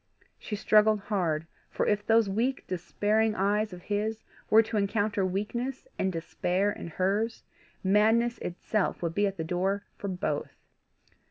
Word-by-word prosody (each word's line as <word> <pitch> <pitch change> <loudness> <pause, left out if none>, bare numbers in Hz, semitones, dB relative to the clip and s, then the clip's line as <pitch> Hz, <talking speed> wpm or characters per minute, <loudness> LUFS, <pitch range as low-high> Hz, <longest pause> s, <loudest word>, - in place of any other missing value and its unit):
She 210 - -4
struggled 215 +1 +4
hard, 175 -6 -1 0.2
for - - -1
if 210 0 +1
those 225 -1 +4
weak 235 +7 -1
despairing 210 +4 0
eyes 205 +2 +1
of 180 -1 -10
his 215 +2 -2 0.3
were 220 +1 +7
to 220 +1 -5
encounter 205 0 +1
weakness 235 - -3
and 190 - +1
despair 180 +4 0
in - - -7
hers, 200 +7 -1 0.4
madness 220 +5 +3
itself 185 +2 -2
would 165 -1 -1
be 205 +3 +2
at 195 0 -4
the 160 - -2
door 190 +4 -1 0.2
for 200 - -4
both. 180 -6 -2
205 Hz, 150 wpm, -29 LUFS, 185-220 Hz, 0.4 s, were